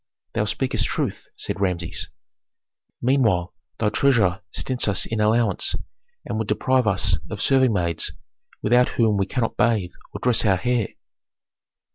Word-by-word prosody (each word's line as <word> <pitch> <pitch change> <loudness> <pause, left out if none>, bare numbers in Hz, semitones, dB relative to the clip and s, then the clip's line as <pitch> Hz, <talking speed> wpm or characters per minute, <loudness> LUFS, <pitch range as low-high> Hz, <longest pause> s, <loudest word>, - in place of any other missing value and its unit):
"Thou 105 - 0
speakest 110 +5 -1
truth," - - -3
said 100 - -5
Rameses. 90 -3 -2 0.9
"Meanwhile 115 -9 +2 0.2
thy 105 - +1
treasurer 110 -7 +2
stints 130 -3 -1
us 100 -2 +1
in 110 - -3
allowance, 110 +2 +2 0.5
and 110 - -3
would 110 - -2
deprive 130 +3 +2
us 100 - +2
of - - -5
serving 130 -2 +3
maids, 85 -4 -1 0.5
without 120 +3 +4
whom 110 -3 +3
we 95 0 0
cannot 115 +1 -2
bathe 105 -7 +2 0.2
or - - -6
dress 125 -3 +2
our 100 -4 +3
hair." 120 +2 0
110 Hz, 140 wpm, -23 LUFS, 100-125 Hz, 0.9 s, without